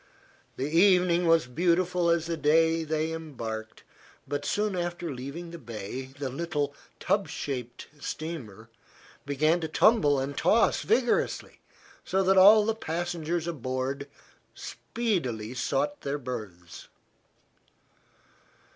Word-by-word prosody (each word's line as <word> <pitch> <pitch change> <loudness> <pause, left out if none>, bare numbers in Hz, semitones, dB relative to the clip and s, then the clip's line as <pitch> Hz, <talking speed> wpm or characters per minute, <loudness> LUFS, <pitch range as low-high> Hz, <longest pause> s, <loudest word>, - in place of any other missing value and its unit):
The 135 - -1
evening 180 +1 +4
was 165 -1 +4
beautiful 175 +5 +1
as 170 -1 +2
they 160 0 +1
embarked, 115 -9 -6 0.4
but 145 +1 -3
soon 210 -1 0
after 175 -2 -3
leaving 140 +7 -7
the 170 - -8
bay 120 0 -6
the 140 -1 -3
little, 145 0 -2 0.3
tub 200 -1 +1
shaped 125 -3 -5
steamer 125 - -6 0.6
began 155 +5 +2
to 160 - -2
tumble 155 - +4
and 140 +2 -3
toss 225 +10 +3
vigorously, 245 -2 0 0.4
so 190 +1 +1
that 190 +1 +4
all 210 +2 +8
the 225 - +1
passengers 170 -3 -3
aboard 135 -2 -3 0.5
speedily 130 - -3
sought 290 - -1
their 140 +1 -2
berths. 105 - -8
160 Hz, 110 wpm, -28 LUFS, 135-175 Hz, 0.6 s, all